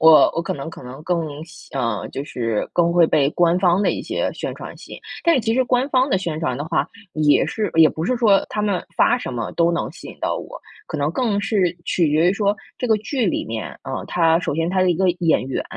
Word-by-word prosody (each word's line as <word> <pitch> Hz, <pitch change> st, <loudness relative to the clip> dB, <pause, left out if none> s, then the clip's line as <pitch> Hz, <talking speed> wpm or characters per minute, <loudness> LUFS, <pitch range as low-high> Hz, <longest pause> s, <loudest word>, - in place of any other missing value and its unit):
我 160 Hz, -3 st, +7 dB
我 165 Hz, -, 0 dB
可 170 Hz, -, -3 dB
能 145 Hz, +3 st, -6 dB
可 -, -, -11 dB
能 130 Hz, +4 st, -10 dB
更 160 Hz, -3 st, -3 dB
吸 160 Hz, -, -15 dB
呃， 115 Hz, -5 st, -2 dB
就 140 Hz, -, -5 dB
是 115 Hz, -6 st, -2 dB
更 170 Hz, -1 st, +2 dB
会 170 Hz, -1 st, +5 dB
被 140 Hz, -3 st, +2 dB
官 175 Hz, +1 st, +2 dB
方 180 Hz, +1 st, +3 dB
的 -, -, +3 dB
一 -, -, -4 dB
些 -, -, -2 dB
宣 -, -, -5 dB
传 -, -, -9 dB
吸 -, -, -13 dB
引。 -, -, -9 dB, 0.2 s
但 335 Hz, -1 st, +4 dB
是 260 Hz, -, +2 dB
其 225 Hz, 0 st, 0 dB
实 260 Hz, +2 st, +3 dB
官 250 Hz, +2 st, +1 dB
方 260 Hz, +1 st, +3 dB
的 -, -, +2 dB
宣 165 Hz, -4 st, -3 dB
传 130 Hz, -5 st, -1 dB
的 145 Hz, -, -4 dB
话， 160 Hz, -, -1 dB, 0.2 s
也 150 Hz, -2 st, +3 dB
是 215 Hz, -4 st, -2 dB
也 160 Hz, -1 st, +7 dB
不 160 Hz, -, -5 dB
是 255 Hz, -, +1 dB
说 215 Hz, -5 st, +4 dB
他 210 Hz, -, -2 dB
们 200 Hz, -4 st, 0 dB
发 250 Hz, -, +4 dB
什 185 Hz, -, -5 dB
么 115 Hz, -2 st, -4 dB
都 170 Hz, 0 st, +2 dB
能 170 Hz, -, -2 dB
吸 -, -, -11 dB
引 -, -, -11 dB
到 -, -, -1 dB
我， -, -, -8 dB, 0.3 s
可 155 Hz, -, -5 dB
能 145 Hz, +1 st, 0 dB
更 225 Hz, -4 st, 0 dB
是 190 Hz, -4 st, 0 dB
取 170 Hz, -4 st, +1 dB
决 160 Hz, +4 st, +3 dB
于 -, -, +1 dB
说 205 Hz, 0 st, 0 dB, 0.2 s
这 250 Hz, -, -2 dB
个 220 Hz, -, +4 dB
剧 225 Hz, +1 st, -1 dB
里 -, -, -1 dB
面， 110 Hz, -4 st, -6 dB
嗯， -, -, -4 dB
它 165 Hz, -2 st, +3 dB
首 165 Hz, -, -2 dB
先 165 Hz, +2 st, 0 dB
它 185 Hz, 0 st, +1 dB
的 185 Hz, -1 st, +3 dB
一 -, -, +2 dB
个 185 Hz, +2 st, +2 dB
演 165 Hz, -6 st, +2 dB
员， 135 Hz, -, -2 dB
170 Hz, 280 characters per minute, -21 LUFS, 155-205 Hz, 0.3 s, 我